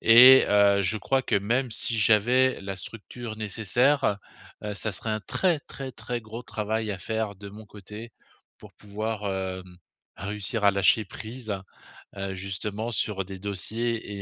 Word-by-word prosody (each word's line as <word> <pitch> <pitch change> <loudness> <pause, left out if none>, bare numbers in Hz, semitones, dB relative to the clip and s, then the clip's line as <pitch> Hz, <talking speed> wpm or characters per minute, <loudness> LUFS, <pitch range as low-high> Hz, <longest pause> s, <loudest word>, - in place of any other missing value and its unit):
Et, 125 +3 +9
heu, 100 -1 +5
je 100 +3 +1
crois 135 +6 +1
que 120 - -1
même 120 +6 0
si 115 +1 -1
j'avais 120 +5 +4
la 95 0 -5
structure 110 +3 -8
nécessaire, 110 +3 +1 0.4
heu, 105 -1 -4
ça 110 +1 -3
serait 110 +3 -3
un 110 - -1
très, 170 - +1
très, 135 -2 -7
très 120 +1 -4
gros 110 +2 -8
travail 110 0 -2
à 100 - -2
faire 110 +1 -3
de 100 +1 -9
mon 105 +1 -11
côté, 105 +2 -10 0.5
pour - - -14
pouvoir, 105 +1 -4
hem, 95 -1 -5 0.4
réussir 105 +3 -3
à 100 - +7
lâcher 100 +3 +3
prise, 110 +4 -8 0.7
heu, 95 -1 -3
justement 100 +4 -4
sur 105 -3 -1
des 95 0 -8
dossiers 105 +2 -2
110 Hz, 155 wpm, -26 LUFS, 100-115 Hz, 0.7 s, Et